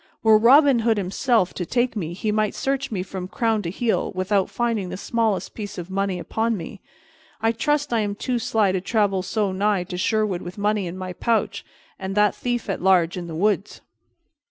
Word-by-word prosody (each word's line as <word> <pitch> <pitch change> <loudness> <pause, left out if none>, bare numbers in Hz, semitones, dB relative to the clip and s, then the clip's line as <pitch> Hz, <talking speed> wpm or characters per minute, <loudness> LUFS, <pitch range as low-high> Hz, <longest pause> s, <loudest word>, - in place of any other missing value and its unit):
Were 220 -1 +6
Robin 270 +2 +6
Hood 225 -1 +2
himself 200 +1 +1
to 180 - -3
take 240 +6 0
me, 170 -5 -3
he 210 +4 -2
might 215 -1 0
search 275 0 -1
me 190 -5 -2
from 185 -1 -6
crown 225 +1 0
to 170 - -4
heel 225 +5 -1
without 190 +1 +1
finding 230 -6 -1
the - - -5
smallest 220 -1 -1
piece 205 -2 -7
of 175 +1 -7
money 195 -1 -1
upon 225 +5 -1
me. 185 +3 -8 0.6
I 225 +1 +2
trust 290 +3 0
I 230 - +3
am 205 -1 -1
too 245 +3 -2
sly 215 -3 +2
to 185 -1 -1
travel 200 -2 +1
so 205 +1 -1
nigh 200 0 +1
to 180 0 -6
Sherwood 210 -3 0
with 180 +2 -8
money 205 -2 0
in 175 +2 -6
my 185 -1 -5
pouch, 225 +5 0 0.4
and 190 0 -4
that 210 0 +4
thief 245 -1 -3
at 195 - -3
large 180 -2 +3
in 175 -2 -5
the 165 - -6
woods." 205 +3 0
205 Hz, 205 wpm, -23 LUFS, 185-225 Hz, 0.6 s, Were